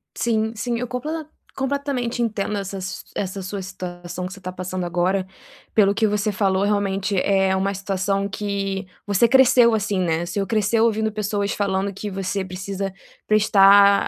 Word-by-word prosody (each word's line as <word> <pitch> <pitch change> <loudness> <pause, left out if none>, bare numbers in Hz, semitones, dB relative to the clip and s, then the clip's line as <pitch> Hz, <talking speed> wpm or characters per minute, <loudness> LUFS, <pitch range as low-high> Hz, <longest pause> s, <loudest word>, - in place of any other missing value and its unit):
Sim, 220 -1 0
sim. 235 +2 -2
Eu 250 - -3
completa 305 +5 -4 0.3
completamente 270 -3 -2
entendo 210 -2 -1
essa 195 0 -4
s 185 0 -5
essa 195 0 -3
sua 195 +1 -5
situação 180 -1 -6
que 185 - -6
você 200 - -11
tá 185 0 -5
passando 185 0 -4
agora. 180 +2 0 0.5
Pelo 200 -2 +5
o - - -3
que 220 +1 +2
você 210 0 0
falou, 190 0 +1
realmente 200 -1 0
é 195 -1 +2
uma 195 +1 0
situação 195 +1 -1
que 195 -2 -3 0.2
você 205 +3 +3
cresceu 245 -2 +6
assim, 200 -3 0
né. 170 -1 0
Você 195 +3 -2
cresceu 220 +2 +2
ouvindo 220 -1 +1
pessoas 205 -1 -1
falando 195 -1 -1
que 205 +2 -5
você 195 0 -2
precisa 190 +1 -4 0.3
prestar 200 -1 +6
200 Hz, 165 wpm, -22 LUFS, 190-215 Hz, 0.5 s, cresceu